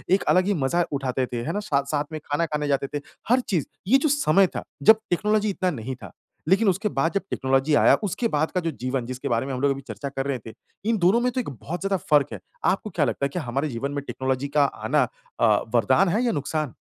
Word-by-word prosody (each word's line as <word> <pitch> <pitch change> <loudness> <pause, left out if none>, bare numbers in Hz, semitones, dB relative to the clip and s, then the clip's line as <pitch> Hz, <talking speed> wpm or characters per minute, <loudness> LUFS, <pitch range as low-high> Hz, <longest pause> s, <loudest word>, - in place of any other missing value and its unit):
एक 200 - -2
अलग 185 0 +4
ही 205 - +2
मज़ा 170 +5 +2
उठाते 130 -2 -1
थे, 120 -1 -4
है 155 - -2
ना 205 - -1
साथ-साथ 140 +1 +1
में 155 - -4
खाना 145 +3 0
खाने 150 -2 -2
जाते 140 -1 0
थे, 145 - -2 0.3
हर 250 +2 +5
चीज़ 170 - +1 0.2
ये 260 +7 +6
जो 295 +3 +1
समय 195 - +4
था - - -3 0.2
जब 220 0 +7
टेक्नोलॉजी 210 +4 +1
इतना 185 -2 0
नहीं 130 -2 -5
था। - - -11 0.4
लेकिन 200 +4 +4
उसके 195 +3 0
बाद 165 0 0
जब 200 - +1
टेक्नोलॉज़ी 135 +3 +1
आया, - - +6
उसके 210 +4 0
बाद 155 +2 +1
का 185 - 0
जो 165 -1 -1
जीवन 130 -1 -1
जिसके 130 +3 -5
बारे 115 +1 +1
में 135 - -4
हम 125 - -3
लोग 140 0 +3
अभी 135 0 -3
चर्चा 110 +5 -5
कर 135 0 -4
रहे 135 -3 -1
थे, 110 - -8 0.4
इन 230 - +2
दोनों 190 +5 +4
में 250 +1 +1
तो 255 - -2
एक - - -6
बहुत 150 +6 -6
ज़्यादा 195 0 0
फर्क 145 -2 +5
है। - - -6 0.3
आपको 195 +3 -3
क्या 165 -6 +1
लगता 140 +2 -1
है - - -1
कि - - -1
हमारे 140 +1 -2
जीवन 135 +3 -3
में 145 -1 -3
टेक्नोलॉजी 130 +1 -2
का 145 - +6
आना - - +1 0.4
अ, - - +4 0.3
वरदान 195 - +4
है 215 +8 +1
या 235 - +2
नुकसान? 150 - -2
150 Hz, 255 wpm, -24 LUFS, 135-195 Hz, 0.4 s, जब